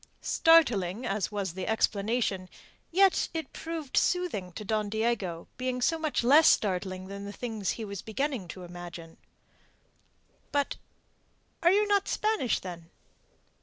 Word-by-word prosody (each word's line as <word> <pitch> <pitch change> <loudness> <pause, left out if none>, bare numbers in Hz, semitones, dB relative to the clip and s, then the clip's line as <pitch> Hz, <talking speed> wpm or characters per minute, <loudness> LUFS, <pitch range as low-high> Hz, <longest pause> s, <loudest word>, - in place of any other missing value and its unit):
Startling 240 - +4
as 200 -2 -1
was 200 -4 -3
the 185 0 -5
explanation, 205 -3 0 0.4
yet 385 +2 +4
it 320 - -4
proved 320 -4 -5
soothing 335 - +1
to 210 - -7
Don 215 0 0
Diego, 210 -6 -1
being 255 0 -2
so 325 +6 +1
much 310 -6 0
less 290 +6 +7
startling 185 -2 +1
than 200 +1 -7
the 200 - -6
things 220 -3 -3
he 225 - -4
was 200 -2 -6
beginning 250 -3 -2
to 185 +2 -8
imagine. 175 -2 -9 1.3
"But... 285 -1 0 0.8
Are 345 - +5
you 415 +2 +4
not 405 -1 +2
Spanish, 425 - +1
then?" 170 -3 -8
220 Hz, 135 wpm, -29 LUFS, 190-295 Hz, 1.3 s, less